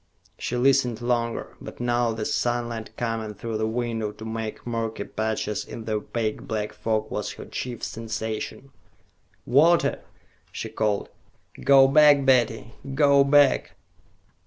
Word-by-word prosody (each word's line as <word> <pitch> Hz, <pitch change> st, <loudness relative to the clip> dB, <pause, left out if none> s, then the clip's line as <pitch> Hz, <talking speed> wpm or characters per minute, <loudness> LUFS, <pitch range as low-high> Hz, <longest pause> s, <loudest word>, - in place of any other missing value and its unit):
She 125 Hz, -, -2 dB
listened 125 Hz, -3 st, +3 dB
longer, 120 Hz, -1 st, -2 dB
but -, -, -10 dB
now 120 Hz, -1 st, +1 dB
the 110 Hz, -1 st, -4 dB
sunlight 120 Hz, -2 st, -1 dB
coming 115 Hz, -3 st, -3 dB
through 115 Hz, 0 st, -4 dB
the 110 Hz, -, 0 dB
window 115 Hz, -2 st, -2 dB
to 110 Hz, -, -10 dB
make 110 Hz, -1 st, -5 dB
murky 115 Hz, -3 st, -3 dB
patches 110 Hz, 0 st, -2 dB
in 115 Hz, -, -9 dB
the 110 Hz, -, -4 dB
opaque 110 Hz, +1 st, -3 dB
black 105 Hz, -1 st, -3 dB
fog 110 Hz, -1 st, -2 dB
was -, -, -3 dB
her -, -, -10 dB
chief 125 Hz, -2 st, -6 dB
sensation. 110 Hz, +3 st, -5 dB, 0.7 s
"Walter!" 165 Hz, +7 st, +4 dB, 0.5 s
she -, -, -5 dB
called. 105 Hz, -2 st, -1 dB, 0.5 s
"Go 135 Hz, -1 st, +7 dB
back, 145 Hz, 0 st, +6 dB
Betty, 120 Hz, -3 st, +2 dB, 0.2 s
go 140 Hz, -1 st, +5 dB
back!" 140 Hz, 0 st, +3 dB
115 Hz, 135 wpm, -25 LUFS, 110-125 Hz, 0.7 s, Go